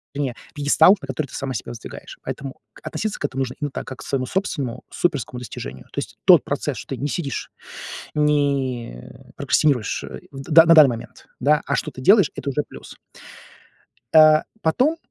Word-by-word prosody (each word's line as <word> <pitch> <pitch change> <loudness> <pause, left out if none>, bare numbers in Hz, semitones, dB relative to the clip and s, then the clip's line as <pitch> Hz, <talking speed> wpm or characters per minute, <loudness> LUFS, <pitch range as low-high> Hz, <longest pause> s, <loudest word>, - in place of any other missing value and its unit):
Вернее 140 -4 -2 0.2
пъедестал, 150 +6 +5
на 140 - -10
который 135 +2 -3
ты - - -11
сама 135 -1 -3
себя 110 - -5
воздвигаешь. 115 -1 -10
Поэтому 135 -1 -6 0.2
относиться 215 -1 -4
к - - -2
этому 135 -1 -3
нужно 130 -1 -3
именно 145 -2 -3
так, - - -6
как 130 - -8
к - - -9
своему 130 -2 -2
собственному 140 -7 -3
суперскому 140 -7 -2
достижению. 65 - -8
То - - -2
есть - - -7
тот - - +7
процесс, - - -3
что - - -6
ты - - -11
не 145 - -2
сидишь, 145 -2 -4 0.6
не 140 - 0 0.3
прокрастинируешь, 130 -8 +1 0.3
в, 135 +3 -9
на 165 +1 +8
данный 155 -4 +8
момент, 115 -1 -8
да, 150 +4 +3
а 140 - 0
что-то 130 - -4
делаешь, 195 - +5
это 140 - -4
уже 145 +2 -1
плюс. - - -12 1.2
Э, 155 0 +8 0.2
потом, 260 - +2
140 Hz, 175 wpm, -22 LUFS, 130-155 Hz, 1.2 s, на